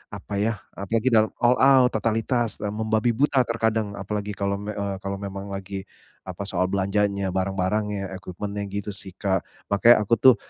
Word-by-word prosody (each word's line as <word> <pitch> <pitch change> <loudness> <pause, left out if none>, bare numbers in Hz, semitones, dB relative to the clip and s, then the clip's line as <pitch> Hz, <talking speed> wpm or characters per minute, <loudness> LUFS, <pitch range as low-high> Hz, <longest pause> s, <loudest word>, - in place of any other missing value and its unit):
apa 100 +1 -8
yah, 110 +1 0 0.2
apalagi 110 +5 0
dal 110 -1 +5 0.2
all 120 +1 +6
out, 130 -2 +6
totalitas, 115 +1 0
eee, 105 - -1
membabi 110 +2 +1
buta 135 0 +3
terkadang, 110 -2 0
apalagi 105 +1 -3
kalau 100 0 -1
me 105 +1 -5
eee, 100 -1 -2
kalau 100 0 -3
memang 100 0 -6
lagi, 100 0 -5 0.4
apa, - - -6
soal 90 - +1
belanjanya, 100 0 0
barang-barangnya, 95 +1 -1
equipment-nya, 100 +3 -5
gitu 100 +1 -3
sih 95 -1 -8
Kak. 95 -2 0 0.3
Makanya 105 +2 +6
aku 115 - +4
tuh 130 0 +8
105 Hz, 165 wpm, -24 LUFS, 100-110 Hz, 0.4 s, tuh